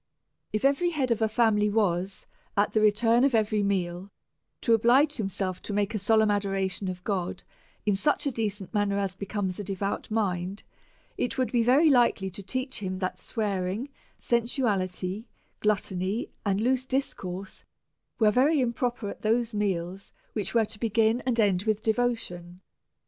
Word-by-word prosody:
If 215 +4 -1
every 285 +6 +3
head 275 -7 -1
of 230 -1 +1
a 220 - +3
family 215 -2 +3
was, 195 -3 0 0.3
at 205 +1 +3
the 215 - +2
return 225 +3 +4
of 275 -3 +3
every 215 -1 +2
meal, 185 -2 -1 0.5
to 230 - +3
oblige 260 +7 +4
himself 195 -3 -3
to 205 - -6
make 205 +1 0
a 215 - -1
solemn 220 +1 +3
adoration 195 -1 -1
of 180 -1 -5
God 185 -4 -2 0.4
in 210 - +3
such 295 +8 +1
a 280 - +1
decent 205 -5 -3
manner 205 -1 +1
as 195 -2 -1
becomes 195 -1 -3
a - - -3
devout 195 0 -3
mind, 195 -3 -1 0.6
it 245 - -1
would 255 -4 0
be 240 - +3
very 275 +7 +5
likely 235 -7 +3
to 200 +3 -8
teach 255 +6 -3
him, 185 -2 -3
that 185 -1 -3
swearing, 205 +3 -2 0.3
sensuality, 215 -5 -1 0.3
gluttony, 200 0 -1
and 200 -1 +1
loose 255 +2 +1
discourse, 195 -8 -3 0.5
were 215 -2 +4
very 280 +7 +3
improper 240 -2 -1
at - - -7
those 230 +1 +1
meals 190 -2 -2 0.2
which 210 +1 -2
were 225 -1 +4
to 210 - -10
begin 225 +1 +2
and 240 -2 +1
end 195 -4 +3
with 215 -2 +1
devotion. 220 -7 -1
210 Hz, 160 wpm, -27 LUFS, 195-235 Hz, 0.6 s, very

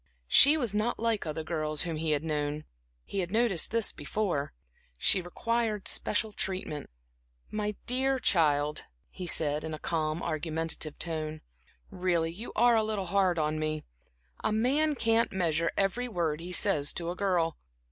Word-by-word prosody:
She 285 - +8
was 240 -9 0
not 215 +3 0
like 225 -5 0
other 155 +1 -3
girls 155 -2 -1
whom 165 -2 -3
he 160 +1 -2
had 150 0 +1
known 150 -1 -2 0.4
he 200 - -4
had 180 -1 -2
noticed 220 -6 +3
this 230 -1 +2
before; 180 -10 -2 0.5
she 185 - +3
required 215 +3 -2
special 215 0 +2
treatment. 185 -7 -4 0.6
"My 210 -1 -2
dear 265 +2 +1
child," 150 - +2 0.3
he 180 -2 -7
said, 150 -2 +1
in 160 -1 -4
a - - -8
calm, 155 0 -2
argumentative 160 -1 -2
tone 155 -2 -2 0.5
"really 175 -3 0
you 210 +8 -8
are 240 +1 +5
a 220 - +3
little 215 -3 -2
hard 185 -1 +2
on 155 0 0
me. 155 0 -2 0.6
A - - +1
man 280 +8 +2
can't 230 -2 +2
measure 165 -3 0
every 200 +6 0
word 170 -8 -1
he 175 +2 -7
says 170 -6 +2
to 170 0 -2
a - - -5
girl. 180 -5 0
175 Hz, 160 wpm, -29 LUFS, 155-215 Hz, 0.6 s, She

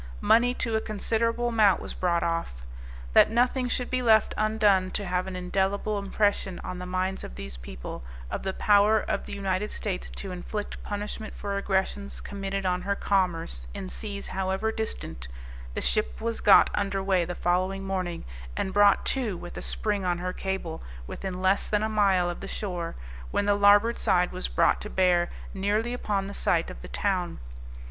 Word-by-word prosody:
Money 235 - +4
to 230 -3 -1
a 220 - +1
considerable 230 +3 0
amount 215 -4 +4
was - - -7
brought 170 -2 +1
off. 165 - -2 0.5
That - - +7
nothing 250 +2 +2
should 245 0 -1
be 255 0 +1
left 220 -3 +4
undone 210 -3 +3
to 205 - -5
have 180 0 -1
an 190 - -5
indelible 195 +3 0
impression 200 -2 0
on 180 - -5
the 180 - -6
minds 185 +1 -1
of - - -8
these 65 0 -7
people, - - -8 0.3
of - - -2
the 190 - -2
power 210 +2 +4
of - - -3
the - - -6
United 195 +1 -1
States 190 -4 -4
to 195 - -7
inflict 205 +4 -5
punishment 210 +1 -5
for 200 -1 -3
aggressions 200 0 -1
committed 195 -1 -4
on 180 0 +1
her 200 +1 -1
commerce, 170 - 0
in 185 - -5
seas 200 -1 -6
however 190 +3 -1
distant, 80 - -5 0.5
the - - -1
ship 215 - 0
was 230 0 -3
got 200 - +7
underway 195 -2 +1
the 175 +1 -4
following 185 +2 0
morning, 185 -3 -3 0.3
and 190 - -1
brought 205 0 +5
to, 235 -9 -1
with 175 - -9
a - - -5
spring 205 -2 -2
on 175 -1 +1
her 180 +1 -3
cable, 190 -5 -4 0.2
within 185 - -5
less 190 +1 +3
than 210 0 +1
a - - +2
mile 195 -4 +3
of 175 - -4
the 195 - -7
shore, 180 -5 -4 0.3
when 205 - 0
the 205 - +4
larboard 205 +3 +5
side 180 0 +2
was - - -2
brought - - +2
to - - -5
bear 180 -2 +3 0.2
nearly 210 +5 0
upon 205 -5 -1
the 200 - -6
site 170 -4 +1
of - - -10
the - - -8
town. 185 -4 -1
195 Hz, 185 wpm, -27 LUFS, 180-210 Hz, 0.5 s, That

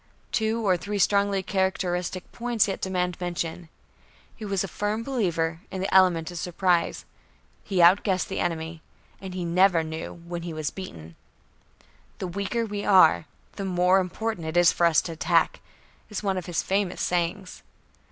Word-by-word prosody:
Two 220 0 0
or 185 -2 +4
three 205 +4 -4
strongly 200 -1 +2
characteristic 185 -2 -1
points 235 -3 +1
yet 195 - -4
demand 180 -2 -2
mention. 175 -1 -4 0.7
He 220 - -10
was 195 -2 -1
a - - -3
firm 210 +5 -2
believer 170 -10 -1
in 190 - -5
the 190 +2 -2
element 180 -3 +4
of 175 - -6
surprise; 180 0 0 0.6
he 185 -4 +2
outguessed 185 +1 +4
the 190 - -4
enemy. 165 -1 -3 0.4
And 190 -1 -7
he 180 -2 -3
never 175 0 +4
knew 160 0 -6
when 175 0 -5
he 170 -1 -6
was 155 -1 -3
beaten. 85 - -9 1.0
"The - - -4
weaker 200 +6 -2
we 205 -1 -4
are, 185 -6 +5 0.3
the 200 - -3
more 180 0 +3
important 185 -1 -3
it 160 +2 -2
is 175 -1 +6
for 170 - +3
us 165 - +3
to 170 - -5
attack," 165 +1 +1 0.5
is 210 -1 -5
one 195 -2 0
of 185 -1 -4
his 175 -2 -1
famous 195 -1 -1
sayings. 180 +2 -2
180 Hz, 165 wpm, -26 LUFS, 170-195 Hz, 1.0 s, is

